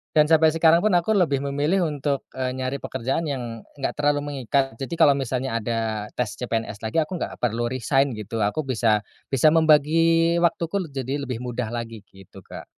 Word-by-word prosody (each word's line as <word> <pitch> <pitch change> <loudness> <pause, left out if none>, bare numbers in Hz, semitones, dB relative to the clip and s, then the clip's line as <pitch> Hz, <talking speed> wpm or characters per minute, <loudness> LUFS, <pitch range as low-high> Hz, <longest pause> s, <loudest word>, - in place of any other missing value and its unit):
dan 150 -1 +6
sampai 160 0 +5
sekarang 165 0 +5
pun 210 0 +2
aku 175 +5 +2
lebih 160 -9 +2
memilih 145 +7 0
untuk, 140 -1 -2
eee, 130 -1 -3
nyari 130 +1 -3
pekerjaan 130 +7 -3
yang, 120 -5 -4 0.2
nggak 140 - -2
terlalu 145 0 +1
mengikat. 135 -2 -1
Jadi 135 +5 -4
kalo 160 -3 +6
misalnya 130 -3 -1
ada 110 -2 -2
tes 110 -4 -3
CPNS 115 -4 -3
lagi, 110 0 -6
aku 175 +3 -6
nggak - - -4
perlu 120 0 0
resign 130 +1 0
gitu. 110 +1 -5
Aku 105 +9 0
bisa 115 -5 +1 0.2
bisa 135 +3 +3
membagi 165 +2 +4
waktuku 170 +2 0
leb 170 -6 -6
jadi 135 +2 -2
lebih 125 -1 -4
mudah 125 -1 -3
lagi, 115 -2 -5
gitu 95 -1 -15
Kak. - - -11
135 Hz, 185 wpm, -23 LUFS, 120-155 Hz, 0.2 s, dan